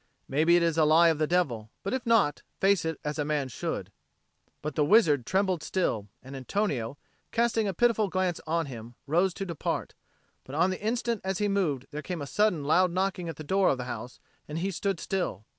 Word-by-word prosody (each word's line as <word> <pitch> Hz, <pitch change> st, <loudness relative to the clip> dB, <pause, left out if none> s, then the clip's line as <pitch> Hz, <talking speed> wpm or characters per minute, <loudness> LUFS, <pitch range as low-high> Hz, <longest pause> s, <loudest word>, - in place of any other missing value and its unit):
Maybe 160 Hz, +5 st, +3 dB
it 175 Hz, -, +4 dB
is 165 Hz, -1 st, +1 dB
a -, -, +6 dB
lie 160 Hz, +2 st, +6 dB
of 160 Hz, -2 st, 0 dB
the 155 Hz, -, +2 dB
devil; 130 Hz, -12 st, 0 dB
but 195 Hz, -, -2 dB
if 260 Hz, -2 st, -3 dB
not, 225 Hz, -11 st, +3 dB, 0.2 s
face 195 Hz, -3 st, +3 dB
it 160 Hz, -1 st, -2 dB
as 150 Hz, +1 st, -3 dB
a -, -, +2 dB
man 145 Hz, -2 st, -1 dB
should." -, -, -4 dB, 0.7 s
But 150 Hz, 0 st, -3 dB
the 150 Hz, -, +2 dB
wizard 150 Hz, -, +4 dB
trembled 190 Hz, -3 st, +1 dB
still; 115 Hz, -, -1 dB, 0.2 s
and 135 Hz, +2 st, -9 dB
Antonio, 135 Hz, -, -2 dB, 0.3 s
casting 230 Hz, -2 st, +1 dB
a 195 Hz, -, -1 dB
pitiful 230 Hz, 0 st, +3 dB
glance 185 Hz, -2 st, -1 dB
on 165 Hz, +1 st, +1 dB
him, 120 Hz, -3 st, -9 dB
rose 175 Hz, +6 st, +2 dB
to 195 Hz, -, -4 dB
depart. 170 Hz, -5 st, -3 dB, 0.5 s
But 135 Hz, -, -9 dB
on 180 Hz, +4 st, +3 dB
the 185 Hz, -, -5 dB
instant 230 Hz, 0 st, -1 dB
as 190 Hz, 0 st, -1 dB
he 210 Hz, -, +1 dB
moved, 170 Hz, -10 st, 0 dB
there 150 Hz, 0 st, -5 dB
came 180 Hz, +1 st, -5 dB
a -, -, -4 dB
sudden 180 Hz, -1 st, +1 dB
loud 180 Hz, +5 st, +4 dB
knocking 185 Hz, -1 st, -1 dB
at 165 Hz, -, -5 dB
the 155 Hz, -, -8 dB
door 190 Hz, +5 st, +2 dB
of 135 Hz, -, +1 dB
the 125 Hz, -, -4 dB
house, 125 Hz, 0 st, -7 dB, 0.3 s
and 150 Hz, -, -5 dB
he 190 Hz, +4 st, -1 dB
stood 195 Hz, 0 st, -2 dB
still. 175 Hz, -, -3 dB
170 Hz, 215 wpm, -28 LUFS, 145-195 Hz, 0.7 s, a